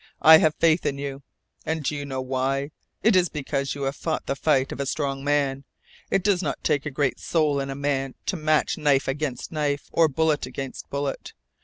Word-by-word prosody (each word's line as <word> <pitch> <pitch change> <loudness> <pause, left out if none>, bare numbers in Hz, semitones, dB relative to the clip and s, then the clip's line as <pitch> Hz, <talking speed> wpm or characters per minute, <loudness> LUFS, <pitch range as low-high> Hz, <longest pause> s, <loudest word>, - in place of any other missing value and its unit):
I 160 0 +10
have 155 -1 +2
faith 165 0 +3
in 140 - -1
you. 140 -1 -5 0.4
And 160 -1 -2
do 150 - -1
you 145 0 -4
know 130 -2 -3
why? 135 +2 -1 0.3
It 220 -2 +5
is 180 -2 +4
because 140 -2 -2
you 140 - -5
have 135 +1 -1
fought 160 +1 -3
the 135 - -1
fight 135 -2 +1
of - - -6
a 140 - -2
strong 135 -2 -2
man. 140 -2 0 0.5
It 195 - +1
does 195 -2 +2
not 155 - -3
take 145 0 0
great 135 0 0
soul 155 -4 +1
in 135 0 -3
a 135 - -4
man 135 -2 -1
to 190 - -1
match 155 -2 +1
knife 140 -2 +2
against 135 -1 -3
knife, 145 -3 -2
or 165 -1 +4
bullet 155 +1 0
against 135 -2 -7
bullet. 140 -1 -4
145 Hz, 205 wpm, -25 LUFS, 135-155 Hz, 0.5 s, I